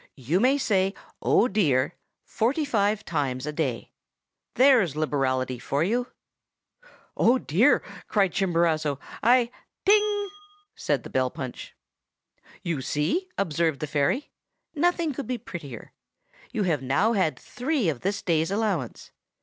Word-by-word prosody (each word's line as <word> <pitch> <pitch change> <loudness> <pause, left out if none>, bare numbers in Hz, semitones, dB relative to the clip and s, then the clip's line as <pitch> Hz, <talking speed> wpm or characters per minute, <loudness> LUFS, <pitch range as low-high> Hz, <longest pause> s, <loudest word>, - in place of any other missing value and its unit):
You 140 +8 0
may 260 +5 +4
say 195 -7 +1 0.3
"Oh, 235 - +4
dear!" 145 - +1 0.3
forty 275 +8 0
five 210 -5 +1
times 135 -5 -2
a 150 - -4
day. 135 -7 -2 0.6
There's 245 - +5
liberality 130 -4 0
for 140 +5 -1
you!' 240 +7 0 1.1
"'Oh, 245 +3 +4
dear!' 235 - +3 0.2
cried 200 -4 +2
Chimborazo, 165 -6 +1 0.2
'I—' 240 +1 +4 0.3
"'Ting!' 415 0 +3 0.4
said - - -1
the - - -10
bell 130 -1 +1
punch. 130 -1 -7 0.9
"'You 170 -7 -2
see!' 155 - -1
observed 165 -5 0
the - - -2
fairy. 150 - 0 0.4
'Nothing 335 -1 +1
could 265 -2 -6
be 250 - -2
prettier. 160 - -9 0.6
You 210 - -1
have 160 -7 0
now 140 - +2
had 185 -7 +1
three 265 - -2
of 145 -6 -1
this 200 +2 -2
day's 160 -2 +1
allowance. 200 - -2
185 Hz, 130 wpm, -26 LUFS, 145-245 Hz, 1.1 s, There's